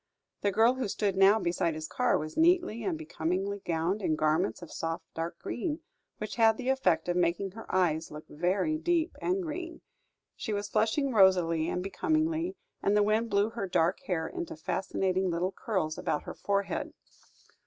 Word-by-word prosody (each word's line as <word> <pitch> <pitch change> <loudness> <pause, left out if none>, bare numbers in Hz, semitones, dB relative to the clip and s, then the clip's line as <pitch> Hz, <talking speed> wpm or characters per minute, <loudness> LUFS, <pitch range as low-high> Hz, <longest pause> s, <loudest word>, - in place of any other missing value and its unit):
The 200 - +2
girl 225 +5 +4
who 260 -3 -2
stood 200 -1 -1
now 195 +2 +6
beside 170 -4 0
his 155 0 -5
car - - +1
was 155 +1 -5
neatly 345 -8 +3
and 350 -4 -1
becomingly 195 - -2
gowned 170 +5 -1
in 160 -5 +1
garments 155 +4 +1
of 170 - -10
soft 165 +1 -4
dark 165 +1 -4
green, 305 +5 -3 0.4
which 215 +2 -5
had 225 -1 +5
the 255 0 -3
effect 180 -12 +2
of 175 - 0
making 180 +2 +1
her 225 +3 -10
eyes 165 -4 +1
look 150 +1 -9
very 190 - 0
deep 345 0 +1
and 370 +1 0
green; 335 +1 -5 0.5
she 220 - -4
was 205 0 -2
flushing 225 +7 +1
rosily 175 -5 +4
and 180 - -2
becomingly, 320 - 0 0.3
and 205 +1 +2
the 210 - +5
wind 215 +2 +1
blew 205 +2 +2
her 225 -4 -3
dark 175 0 +2
hair 160 -4 -1
into 170 - -5
fascinating 190 +3 -1
little 175 +2 0
curls 185 -6 -2
about 150 - -1
her - - -6
forehead. 200 0 -2
195 Hz, 175 wpm, -30 LUFS, 170-235 Hz, 0.5 s, now